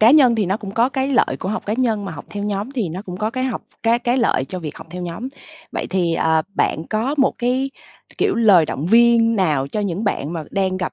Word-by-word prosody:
cá 220 +3 +7
nhân 265 -6 +6
thì 210 -4 0
nó 195 +3 0
cũng 200 -3 -7
có 230 +4 +2
cái 265 +1 -1
lợi 275 - +2
của 185 - -3
học 215 - -3
cá 210 - 0
nhân, 225 -5 0
mà 185 - -5
học 145 - -9
theo 205 -1 -5
nhóm 205 +4 -2
thì 230 -9 -1
nó 180 +4 -6
cũng 180 -3 -7
có 215 +3 -1
cái 255 +1 -2
học 255 - -3 0.2
cái 230 +1 +3
cái 245 +1 0
lợi 230 - +2
cho 185 - -5
việc 155 -4 -7
học - - -11
theo 180 +1 -6
nhóm. 175 +9 -5 0.4
Vậy - - -3
thì, 175 -3 +1
ờ, 160 -1 +2
bạn 160 - +1
có 225 +6 0
một 270 - +4
cái, 255 +3 0 0.5
kiểu, - - +2
lời 205 -8 +5
động 150 +5 -3
viên 230 +1 +5
nào 150 -8 +1
cho 210 - -2
những 200 +1 -2
bạn 160 -5 -1
mà 160 -3 -4
đang 190 -1 0
gặp, 185 -1 -3
210 Hz, 265 wpm, -20 LUFS, 180-235 Hz, 0.5 s, cá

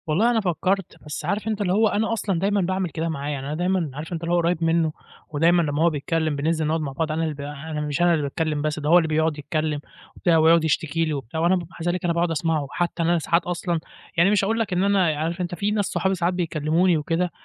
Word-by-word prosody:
والله 200 +10 +3
أنا 225 -2 +2
فكّرت، 190 +1 -1
بس 150 0 -5
عارف 205 +2 -1
أنت 215 -1 -1
اللي 185 -2 +1
هو 220 +2 +4
أنا 220 +2 0
أصلًا 200 -5 -1
دايمًا 200 +2 +1
باعمل 185 0 -1
كده 165 +1 -3
معاه، 145 -2 -3
يعني 140 -2 -4
أنا 150 - -3
دايمًا 175 -2 0
عارف 155 +5 -6
أنت 165 0 -4
اللي 170 +1 -1
هو - - +4
قُريّب 170 0 +1
منّه 165 -1 +2 0.4
ودايمًا 165 +3 +3
لمّا 150 -1 0
هو 170 - +5
بيتكلّم 160 0 -1
بننزل 155 +2 0
نقعد 160 +1 0
مع 145 -3 -3
بعض 155 +3 -2
أنا 160 +1 -1
اللي 155 -2 -1
ب 145 - -9
أنا 150 +2 -5
مش 150 +2 -2
أنا 175 0 +5
اللي 155 -3 0
باتكلّم 150 +1 -1
بس 155 +1 -1
ده 150 0 -2
هو 175 - +7
اللي 165 -2 +3
بيقعد 155 0 +1
يتكلّم 155 0 -2 0.4
وبتاع 170 -2 +2
ويقعد 160 +1 +5
يشتكي 160 +1 0
لي 155 - -2
وبتاع 140 +1 -4
وأنا 170 +3 +3
بابقى 175 -3 -4
مع 170 +1 -2
ذلك 180 0 -3
باقعد 170 0 +1
أسمعه. 160 -2 0
حتّى 175 -1 -1
إن - - +1
أنا 175 -1 +3
ساعات 170 +2 +1
أصلًا 175 -1 -1 0.4
يعني - - +5
أنا - - +3
مش 205 -2 +3
هاقول 225 +3 0
لك 215 -4 -1
إن 180 +1 +1
أنا 195 -4 +3
ي - - -3
عارف 165 +4 -2
أنت 175 0 -3
في 200 +5 -1
ناس 210 -1 +1
صحابي 190 +1 0
ساعات 175 0 0
بيكلّموني 165 0 +1
وكده 165 +3 -1
165 Hz, 265 wpm, -23 LUFS, 155-180 Hz, 0.4 s, هو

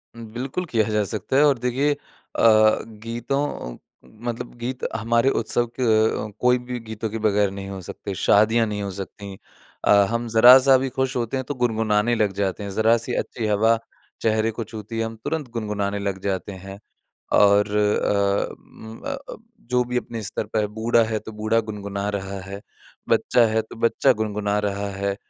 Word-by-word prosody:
बिल्कुल 120 +9 -5
किया 115 -8 +1
जा 105 -1 +1
सकता 110 +5 -3
है 145 - +6
और 140 -3 +4
देखिए 130 +4 +1
अ, - - -8 0.9
गीतों 115 - -4
अ, - - -17 0.3
मतलब 120 - -6
गीत 125 +2 -4 0.2
हमारे 115 +3 +2
उत्सव 120 0 +1
के 110 -2 +2
कोई 125 0 +4
भी 125 0 -6
गीतों 110 -1 -5
के 110 - -4
बगैर 105 -2 +2
नहीं 100 0 -7
हो 95 -1 -6
सकते 100 +3 -7
शादियाँ 110 +5 +4
नहीं 105 -1 -3
हो 100 - -4
सकती। 95 +1 -8 0.5
अ, - - +5 0.2
हम 115 0 -2
ज़रा-सा 130 +4 +8
भी 130 0 -2
खुश 130 +1 -2
होते 120 +2 -1
हैं 130 - -2
तो 145 - -3
गुनगुनाने 115 -1 +1
लग 105 -3 +1
जाते 100 0 -2
हैं 100 - -5
ज़रा-सी 115 +3 +2
अच्छी 115 -3 -6
हवा 110 +2 +3 0.4
चेहरे 110 0 +1
को 115 +1 -5
छूती 110 +1 -8
है 115 - 0
हम 115 0 -6
तुरंत 150 -6 -3
गुनगुनाने 105 -3 -2
लग 100 -1 -3
जाते 100 0 -2
हैं 95 +1 -9 0.6
और 105 0 +5
अ, 100 -1 +1
उम, 110 0 -13
अ 280 - -2
अ, 275 +1 -9 0.2
जो 125 0 0
भी 125 0 -4
अपने 115 -2 -6
स्तर 105 - -3
पे 110 - +1
है 105 - +1
बूढ़ा 115 +1 +3
है 110 -1 -2
तो 110 - -10
बूढ़ा 110 +2 +1
गुनगुना 100 -1 -4
रहा 95 0 -6
है 100 +1 -8 0.5
बच्चा 120 - +3
है 110 0 +1
तो 110 - -13
बच्चा 130 +3 +3
गुनगुना 105 -1 -1
रहा 100 +1 -3
है 100 0 -2
110 Hz, 185 wpm, -23 LUFS, 100-120 Hz, 0.9 s, ज़रा-सा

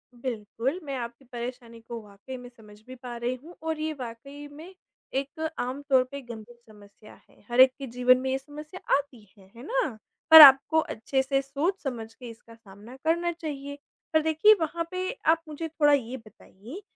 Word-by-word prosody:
बिल्कुल, 240 - -4
मैं 280 -2 -5
आपकी 235 +2 -7
परेशानी 240 -1 -8
को 235 -1 -6
वाक़ई 210 +5 -10
में 245 0 -11
समझ 210 -3 -17
भी 255 - -9
पा 245 -1 -8
रही 245 +2 -2
हूँ 345 +2 -13
और 320 -1 -3
ये 310 0 -2
वाक़ई 275 +5 -9
में 320 +6 -12 0.4
एक 315 +4 -3
आमतौर 265 +1 +1
पे 280 - -6
गंभीर 235 -1 -11 0.2
समस्या 205 +1 -17
है। - - -25
हर 240 - -1
एक 260 0 +9
के 270 - -6
जीवन 250 +1 +3
में 265 - -2
ये 265 - +1
समस्या 300 +5 -11 0.2
आती 265 -7 -8
है, 190 -1 -20
है 235 - -11
ना? 460 - -2 0.3
पर 320 - +13
आपको 280 +3 +8
अच्छे-से 270 +1 -1
सोच-समझ 275 - -3
के 245 0 -11
इसका 230 0 -14
सामना 215 +2 -14
करना 340 +1 +1
चाहिए। 285 -4 -7 0.4
पर 315 - +4
देखिए 320 +7 +5
वहाँ 335 +2 -2
पे 370 0 -3 0.2
आप 325 +1 +4
मुझे 310 +2 -5
थोड़ा 295 -2 +3
ये 260 -1 -1
बताइए 225 - -13
265 Hz, 180 wpm, -27 LUFS, 235-305 Hz, 0.4 s, पर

